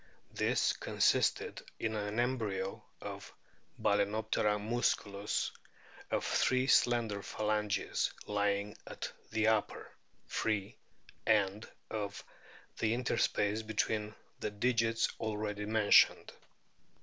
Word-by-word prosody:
This - - +2
consisted - - +1 0.2
in 110 -1 -1
an 105 +1 -2
embryo 110 -6 -1 0.2
of - - -7 0.5
Bal&noptera 105 +1 +1
musculus 105 -2 0 0.6
of - - 0
three 130 0 +2
slender 120 -6 +3
phalanges 105 0 -1
lying 100 0 0
at - - -5 0.2
the 110 0 +1
upper 110 -2 -1 0.3
(free) 105 -3 -1 0.5
end 105 -1 +2 0.2
of 100 -2 -4 0.6
the 110 +1 +2
interspace 110 -3 +1
between 110 0 -1 0.2
the - - -2
digits 115 +1 +1
already 105 -1 -3
mentioned. 110 -1 +5
105 Hz, 90 wpm, -33 LUFS, 105-110 Hz, 0.6 s, mentioned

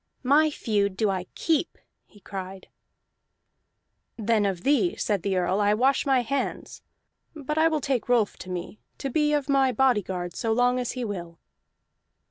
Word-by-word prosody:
"My 295 +4 +4
feud 200 -8 -1
do 215 -2 +2
I 185 -1 -3
keep!" 325 0 0 0.3
he 205 - -20
cried. 190 -1 -8 1.5
"Then 220 -2 +1
of 185 -3 -3
thee," 295 +6 +2
said 205 -4 -1
the 195 0 -1
Earl, 185 +3 +1
"I 205 +1 +3
wash 270 +5 +2
my 265 -2 +4
hands. 275 +3 -3 0.5
But 300 +1 -3
I 320 - +5
will 315 -2 0
take 255 -3 -1
Rolf 235 -4 +2
to 185 - -10
me, 180 +3 -6 0.2
to 275 - -4
be 300 +2 +2
of 295 -2 0
my 270 -2 +3
bodyguard 205 -8 0
so 225 -1 0
long 245 +2 +2
as 245 - -3
he 250 -2 -3
will." 175 -5 -6
230 Hz, 165 wpm, -26 LUFS, 195-275 Hz, 1.5 s, I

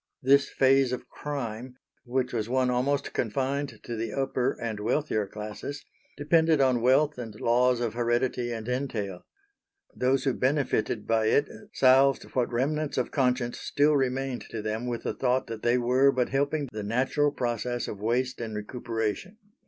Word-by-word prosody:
This 140 +2 +4
phase 135 -1 +3
of 125 - -5
crime, 125 -4 -5 0.3
which 125 +1 -1
was 110 -1 -2
one 130 0 +2
almost 140 +3 0
confined 135 +5 -2
to 120 - -5
the 115 0 -3
upper 135 -2 -1
and 110 -3 -4
wealthier 110 -2 0
classes, 105 +8 -7 0.3
depended 160 +1 +3
on 130 -3 +3
wealth 135 +3 +3
and 110 -3 -7
laws 125 +1 +3
of 115 -3 -1
heredity 120 +1 0
and 115 -1 -5
entail. 115 -8 -3 0.7
Those 130 +1 +1
who 135 - +1
benefited 130 -5 0
by 110 -1 +2
it 145 +6 +3 0.3
salved 135 +1 +5
what 125 -2 0
remnants 145 +5 -1
of 125 - -1
conscience 125 -3 0
still 145 +1 +2
remained 135 -1 -1
to 110 -2 -5
them 110 +3 -3
with 120 -1 -3
the - - -2
thought 130 0 0
that 115 -1 -7
they 120 +1 +2
were 130 +3 +4
but 125 -2 0
helping 140 +2 0
the 105 - -4
natural 130 +7 +1
process 120 -1 -2
of 105 - -6
waste 125 +3 -1
and 110 -2 -5
recuperation. 115 - -4
125 Hz, 160 wpm, -27 LUFS, 115-135 Hz, 0.7 s, salved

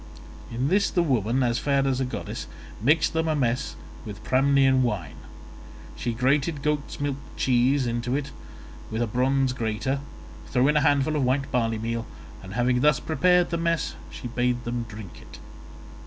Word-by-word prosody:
In 125 +4 -1
this 200 +3 +3
the 175 - +1
woman, 130 - +1
as 120 0 +1
fair 140 -1 +1
as 135 -1 0
a - - +1
goddess, 125 - -5 0.3
mixed 155 +8 +3
them 160 0 0
a 155 - +1
mess 125 -3 -1 0.3
with 105 0 -8
Pramnian 135 0 +4
wine; 105 - -2 0.8
she 120 - -2
grated 140 +5 +1
goat's 150 -1 -2
milk 145 -1 -1 0.2
cheese 130 +2 +2
into 120 +2 -1
it 140 -1 -3 0.6
with 110 +2 -1
a - - +1
bronze 130 +3 +1
grater, 115 +3 -1 0.5
threw 130 +1 +2
in 150 - +3
a - - +4
handful 145 +2 +2
of 145 - +1
white 135 +2 0
barley 115 -2 +1
meal, 115 +1 -3 0.3
and 95 0 -9
having 125 +1 +2
thus 150 -1 +4
prepared 180 +3 +2
the 170 - 0
mess 165 0 0 0.2
she - - -7
bade 120 0 0
them 120 -1 -3
drink 105 -3 -10
it. - - -13
130 Hz, 170 wpm, -25 LUFS, 120-145 Hz, 0.8 s, Pramnian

